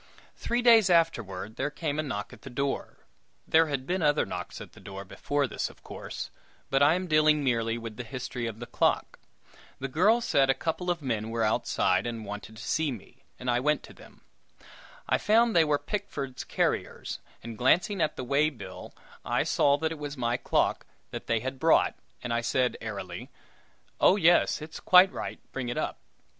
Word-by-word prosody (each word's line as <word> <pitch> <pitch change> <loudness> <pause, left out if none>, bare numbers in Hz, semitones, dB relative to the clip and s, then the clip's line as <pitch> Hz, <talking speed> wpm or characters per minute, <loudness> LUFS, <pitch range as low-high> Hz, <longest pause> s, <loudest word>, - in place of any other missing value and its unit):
Three 240 +1 -1
days 225 -5 +7
afterward, 115 - +1
there 140 +2 0
came 150 0 -3
a - - +3
knock 105 -9 -5
at - - -14
the 135 - -9
door 140 +2 -3 0.4
there 160 0 +5
had 140 -3 -3
been 185 +3 -1
other 150 -1 +3
knocks 90 -1 -6
at - - -10
the - - -15
door 100 0 -8
before 145 +8 -1
this, - - -3
of - - -18
course; - - -7 0.4
but 135 0 +3
I 145 +3 +6
am 185 +1 -2
dealing 155 -2 +4
merely 115 -3 +1
with 115 -2 -7
the 125 - -4
history 125 0 -5
of 110 -1 -6
the 120 - -6
clock. - - 0 0.6
The 135 - -4
girl 185 - +4
said 140 - +2
a 135 - +4
couple 165 +5 -2
of 170 -3 -1
men 110 -4 -2
were 115 0 -1
outside, 100 -2 +1
and 115 -2 -5
wanted 105 +2 -8
to 110 - -9
see 160 -2 0
me, 120 +4 -11
and 125 - -8
I 120 0 +2
went 150 +4 +1
to - - -12
them. - - -17 0.9
I - - +2
found 225 0 +3
they 165 - +7
were 150 -2 +2
Pickford's 145 -10 -4
carriers, - - -2 0.2
and 115 0 -7
glancing 170 - +2
at 155 - +1
the - - -5
way 140 +4 +2
bill, 100 -10 -10 0.3
I - - +1
saw 140 0 +3
that 160 +2 -1
it 160 - -6
was 145 -1 -5
my 120 -1 0
clock 125 - +1 0.3
that - - -7
they 115 -1 +1
had 130 +1 -5
brought, 160 +3 +4 0.3
and 120 -1 -2
I 120 - +1
said, 125 +1 +1
airily, 95 -5 -6 0.7
"Oh, 185 - +6
yes, 175 -4 +4
it's 160 +1 -8
quite 185 +1 +7
right; - - -5
bring 130 -2 -4
it 120 - -3
up!" - - -2
135 Hz, 200 wpm, -28 LUFS, 115-160 Hz, 0.9 s, days